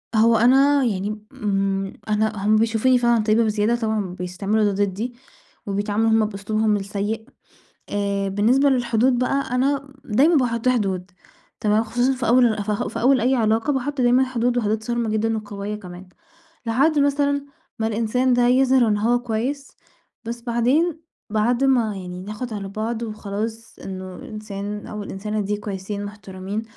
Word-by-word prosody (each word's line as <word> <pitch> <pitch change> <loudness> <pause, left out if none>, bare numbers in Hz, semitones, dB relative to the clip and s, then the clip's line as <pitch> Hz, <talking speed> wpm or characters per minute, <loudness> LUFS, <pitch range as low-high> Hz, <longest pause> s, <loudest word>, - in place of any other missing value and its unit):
هو 230 +1 +5
أنا 270 +4 +5
يعني، 210 -1 -2
إمم، 195 -1 -1 0.2
أنا 215 -1 0
هُم 215 +1 +4
بيشوفوني 225 +3 +3
فعلًا 235 -2 +2
طيبة 220 +2 +3
بزيادة، 215 +1 +1
طبعًا 215 -6 -2
بيستعملوا 195 +4 -1
ده 205 - +3
ضِدِّي، 210 +6 -4 0.5
وبيتعاملوا 205 +2 0
هُم 220 -1 +4
بأسلوبهم 215 +1 0
السَّيِّء، 205 +3 -4 0.6
آآ، 200 -1 -1
بالنسبة 235 +8 +3
للحدود 245 0 +2
بقى، 275 +2 0
أنا 275 +1 0
دايمًا 280 +10 +3
باحُطّ 240 -2 +1
حدود 195 -6 0 0.5
تمام، 215 +1 +2
خصوصًا 245 +4 +1
في 250 -2 -3
أوّل 230 -4 +4 0.2
في - - -5
أوّل 260 0 +4
أي 255 +3 +2
علاقة، 225 +4 +1
باحُطّ 275 +1 -2
دايمًا 250 +1 +4
حدود 245 -1 -1
وحدود 220 -1 0
صارمة 235 0 -1
جدًا 220 +1 0
وقويّة 205 -1 -5
كمان، 180 -2 -11 0.6
لحد 280 +7 +2
مثلًا 285 0 +1 0.3
ما 220 - 0
الإنسان 230 +4 +1
ده 245 - +3
يظهِر 255 -1 +4
إن 210 -1 +1
هو 240 +3 +2
كويّس، 245 +4 -3 0.5
بس 235 +1 -5
بعدين 265 +8 +1 0.3
بعد 235 +5 +1
ما 235 -6 +2
يعني 180 -1 -7
ناخُد 215 +4 -6
على 200 -2 -5
بعض، 220 +3 -3
وخلاص 220 +1 -5
إنّه 185 -1 -7
الإنسان 210 -4 -6
أو 210 -1 -6
الإنسانة 210 +2 -4
دي 205 +1 -1
كويسين 205 0 -5
مُحترمين، 200 0 -6
220 Hz, 150 wpm, -22 LUFS, 205-245 Hz, 0.6 s, هو